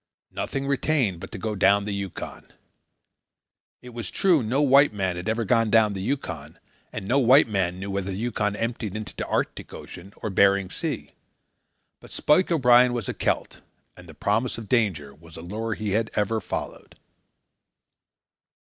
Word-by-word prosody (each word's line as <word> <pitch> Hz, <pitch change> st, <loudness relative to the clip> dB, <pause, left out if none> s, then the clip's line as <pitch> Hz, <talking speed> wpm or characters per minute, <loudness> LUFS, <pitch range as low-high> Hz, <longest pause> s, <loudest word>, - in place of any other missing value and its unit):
Nothing 135 Hz, 0 st, -3 dB
retained 135 Hz, -, 0 dB
but -, -, -9 dB
to -, -, -6 dB
go 110 Hz, +3 st, -3 dB
down 100 Hz, +1 st, +3 dB
the 105 Hz, -, -3 dB
Yukon. 100 Hz, -2 st, -7 dB, 1.3 s
It 125 Hz, -, -10 dB
was 115 Hz, -5 st, -6 dB
true 180 Hz, -7 st, +3 dB
no 120 Hz, +5 st, 0 dB
white 140 Hz, 0 st, +5 dB
man 95 Hz, -3 st, -2 dB
had 90 Hz, +4 st, -4 dB
ever 115 Hz, +1 st, -1 dB
gone 115 Hz, +1 st, +2 dB
down 110 Hz, -1 st, +4 dB
the 95 Hz, -, -5 dB
Yukon, 95 Hz, -, -4 dB, 0.3 s
and 95 Hz, -, -6 dB
no 130 Hz, +6 st, +3 dB
white 130 Hz, +2 st, +6 dB
man 95 Hz, -4 st, -1 dB
knew 100 Hz, +1 st, -5 dB
whether 100 Hz, 0 st, -2 dB
the 95 Hz, -, -4 dB
Yukon 105 Hz, -2 st, -1 dB
emptied 115 Hz, -2 st, -3 dB
into 110 Hz, 0 st, -6 dB
the -, -, -4 dB
Arctic -, -, -3 dB
Ocean 95 Hz, +3 st, -11 dB
or 105 Hz, -, -5 dB
Bering 100 Hz, 0 st, +3 dB
Sea; -, -, -4 dB, 0.9 s
but -, -, -15 dB
Spike 175 Hz, +5 st, +2 dB
O'Brien 125 Hz, -5 st, +5 dB
was 120 Hz, -5 st, -3 dB
a -, -, -2 dB
Celt, -, -, -2 dB, 0.3 s
and 90 Hz, -1 st, -14 dB
the 80 Hz, -, -12 dB
promise 110 Hz, +8 st, 0 dB
of 115 Hz, -2 st, -8 dB
danger 95 Hz, -, 0 dB
was 80 Hz, +2 st, -15 dB
a -, -, -8 dB
lure 110 Hz, +5 st, -3 dB
he 105 Hz, -2 st, -3 dB
had 110 Hz, +2 st, 0 dB
ever 110 Hz, +1 st, 0 dB
followed. -, -, -6 dB
105 Hz, 175 wpm, -25 LUFS, 95-120 Hz, 1.3 s, white